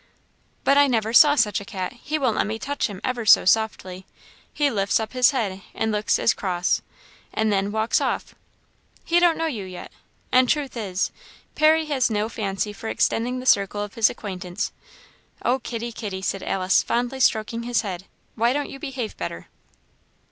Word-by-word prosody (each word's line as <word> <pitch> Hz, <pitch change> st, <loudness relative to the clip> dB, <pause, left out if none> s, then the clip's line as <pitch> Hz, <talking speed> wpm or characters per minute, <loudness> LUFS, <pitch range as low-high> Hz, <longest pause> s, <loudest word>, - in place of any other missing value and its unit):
"But 275 Hz, +1 st, +4 dB
I 285 Hz, -, +6 dB
never 225 Hz, -3 st, 0 dB
saw 295 Hz, +2 st, +7 dB
such 210 Hz, -7 st, +1 dB
a -, -, -7 dB
cat! 185 Hz, -2 st, -5 dB
he 300 Hz, +5 st, -4 dB
won't 255 Hz, -7 st, +1 dB
let -, -, +1 dB
me 220 Hz, +1 st, -3 dB
touch 285 Hz, +5 st, -2 dB
him 200 Hz, -4 st, -9 dB
ever 250 Hz, -2 st, -2 dB
so 210 Hz, -, +6 dB
softly; 190 Hz, -2 st, 0 dB, 0.4 s
he 290 Hz, -2 st, +1 dB
lifts 200 Hz, -2 st, +1 dB
up 220 Hz, +2 st, -5 dB
his 255 Hz, -1 st, +5 dB
head 205 Hz, -8 st, -2 dB
and 220 Hz, -, 0 dB
looks 210 Hz, +1 st, +1 dB
as -, -, +3 dB
cross; 180 Hz, -2 st, -1 dB, 0.5 s
and 220 Hz, -1 st, 0 dB
then 200 Hz, +1 st, 0 dB
walks 220 Hz, +1 st, +1 dB
off." -, -, -2 dB, 0.7 s
"He 345 Hz, +1 st, +3 dB
don't 345 Hz, -2 st, +4 dB
know 325 Hz, -, -1 dB
you 240 Hz, -11 st, -3 dB
yet, 185 Hz, -1 st, -9 dB, 0.4 s
and 255 Hz, -1 st, +4 dB
truth 285 Hz, -4 st, 0 dB
is, 195 Hz, -5 st, -2 dB, 0.4 s
Parry 315 Hz, +1 st, +4 dB
has 275 Hz, -5 st, +1 dB
no 215 Hz, 0 st, -1 dB
fancy 205 Hz, -2 st, -3 dB
for 220 Hz, +2 st, -6 dB
extending 250 Hz, +3 st, 0 dB
the 255 Hz, -, -8 dB
circle 205 Hz, -3 st, +2 dB
of 205 Hz, -, -8 dB
his 225 Hz, -2 st, +4 dB
acquaintance. 185 Hz, -3 st, -5 dB, 0.7 s
Oh, 255 Hz, +2 st, +2 dB
kitty, 235 Hz, -1 st, -5 dB
kitty!" 200 Hz, -4 st, -6 dB
said 195 Hz, 0 st, -2 dB
Alice, 185 Hz, 0 st, +2 dB
fondly 245 Hz, +2 st, -2 dB
stroking 230 Hz, -1 st, +1 dB
his 240 Hz, -2 st, 0 dB
head, 190 Hz, -3 st, -6 dB, 0.3 s
"why 235 Hz, +2 st, +2 dB
don't 290 Hz, 0 st, -2 dB
you 275 Hz, -, -9 dB
behave 260 Hz, -7 st, -5 dB
better?" 85 Hz, -1 st, -6 dB
225 Hz, 185 wpm, -23 LUFS, 200-255 Hz, 0.7 s, saw